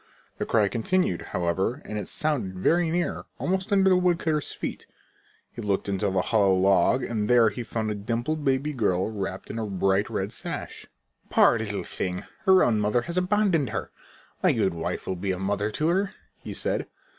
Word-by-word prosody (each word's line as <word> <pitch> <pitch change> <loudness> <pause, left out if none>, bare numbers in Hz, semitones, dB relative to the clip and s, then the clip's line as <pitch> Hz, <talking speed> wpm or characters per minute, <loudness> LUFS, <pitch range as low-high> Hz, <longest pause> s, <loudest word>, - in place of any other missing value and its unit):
The - - -2
cry 110 -3 +3
continued, 115 - 0
however, 90 +6 0
and 105 - -4
it - - -6
sounded 120 -12 -1
very 165 - +2
near, 175 +1 -1
almost 190 +3 -1
under 195 -1 +4
the 185 - +6
woodcutter's 170 -4 +1
feet. - - -6 0.6
He - - -8
looked 100 -1 -1
into 100 +1 0
the 95 -1 +1
hollow 100 -4 +3
log 95 +6 +3
and 105 -3 -2
there 120 -2 +6
he 105 +4 -6
found 110 -1 -3
a - - 0
dimpled 120 +9 -2
baby 140 +2 +1
girl 100 -5 0
wrapped 95 -2 -5
in 115 - -4
a 110 - -2
bright 95 +1 +1
red - - -2
sash. - - -6 0.4
"Poor 115 - +5
little 105 -2 -3
thing! 90 -1 -4 0.2
Her 190 -1 +6
own 110 -3 +2
mother 105 +3 +1
has 170 - -6
abandoned 180 - +2
her. - - -4 0.5
My - - +4
good 95 - +1
wife 85 +2 -4
will 95 - -2
be 95 +2 -4
a - - -4
mother 100 +2 -1
to 155 +9 0
her," 195 +4 0 0.2
he - - -7
said. - - -1
110 Hz, 190 wpm, -26 LUFS, 100-155 Hz, 0.6 s, the